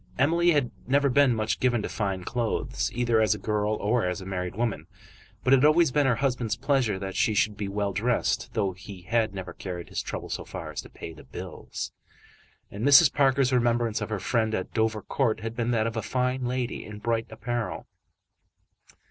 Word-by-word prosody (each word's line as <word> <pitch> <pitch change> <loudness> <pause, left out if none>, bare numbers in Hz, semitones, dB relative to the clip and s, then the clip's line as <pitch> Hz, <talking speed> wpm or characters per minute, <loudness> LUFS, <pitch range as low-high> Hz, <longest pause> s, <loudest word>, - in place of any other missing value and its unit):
Emily 170 +6 +3
had 145 -7 +2 0.2
never 140 +2 +3
been 135 -2 +4
much 110 0 -1
given 120 -4 +2
to - - -2
fine 95 -4 -2
clothes, 115 +3 -1
either 120 -2 +2
as 110 - +3
a - - -6
girl 105 0 0
or 110 +3 +1
as 90 +2 -2
a 95 - -9
married 90 -1 -4
woman; 115 0 -2 0.6
but 130 - +4
it - - +8
had 130 - +4
always 155 -1 +5
been 145 0 +3
her 125 - +3
husband's 125 -3 0
pleasure 125 -5 +1
that 95 0 -5
she 110 - +2
should 105 +1 +2
be 100 0 -4
well 100 0 -2
dressed, 115 +4 0
though 100 -3 +1
he 90 0 -11
had 110 0 0
never 95 -2 -6
carried 90 -4 -6
his - - -2
trouble - - -6
so - - -3
far - - -7
as - - -4
to - - -14
pay 80 - -9
the 80 - -13
bills; - - -7 0.8
and 100 +3 -6
Mrs. 140 +2 +7
Parker's 135 -2 +3
remembrance 120 -2 +1
of 105 - -3
her 105 -2 -2
friend 110 +2 0
at 95 - -4
Dovercourt 110 +1 0
had 115 +1 -5
been 120 0 -1
that 115 -2 +2
of 115 0 -2
a 110 - -1
fine 125 +2 -1
lady 125 0 -2
in 105 -1 -9
bright 115 +1 -1
apparel. 115 +1 -4
115 Hz, 205 wpm, -27 LUFS, 105-125 Hz, 0.8 s, it